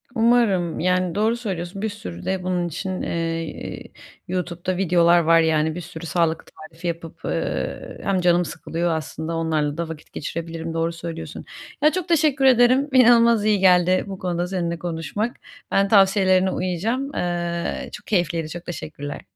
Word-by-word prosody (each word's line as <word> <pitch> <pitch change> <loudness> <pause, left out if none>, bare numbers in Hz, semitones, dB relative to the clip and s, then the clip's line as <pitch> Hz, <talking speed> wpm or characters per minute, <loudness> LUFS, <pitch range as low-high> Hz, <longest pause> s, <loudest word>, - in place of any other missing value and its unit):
Umarım. 225 -8 +2
Yani, 180 -1 +1
doğru 220 +3 +2
söylüyorsun, 195 -3 -5
bir 220 - -1
sürü 90 - -8
de 190 -1 -1
bunun 180 -1 -1
için, 185 +3 -4
eee, 165 -1 -4 0.4
YouTube'da 180 0 -3
videolar 175 -2 +4
var. 165 0 +5
Yani, 160 -1 +2
bir 175 - -5
sürü 165 -1 -9
sağlık 165 0 0
tarifi 165 +2 -10
yapıp, 165 -1 -5
eee, - - -3
hem 190 -2 +1
canım 175 0 +3
sıkılıyor, 170 +2 -3
aslında 160 +1 -4
onlarla 155 -2 0
da 170 -1 -3
vakit 160 -2 -10
geçirebilirim, 165 +1 -5
doğru 165 +1 -1
söylüyorsun. 165 -1 -7 0.4
Ya, 305 - +6
çok 365 0 -3
teşekkür 300 -5 +2
ederim, 255 +2 +5
inanılmaz 235 -3 +6
iyi 210 -2 +3
geldi 185 -1 +4
bu 195 -1 -7
konuda 175 -1 -2
seninle 170 -3 -2
konuşmak. 175 - -3 0.4
Ben 195 0 +3
tavsiyelerine 190 -2 +4
uyacağım. 225 +12 -2
Eee, 175 -1 -2
çok - - -10
keyifliydi, 170 -5 0
çok 175 +2 -8
teşekkürler. 145 -4 -6
175 Hz, 150 wpm, -22 LUFS, 165-195 Hz, 0.4 s, Ya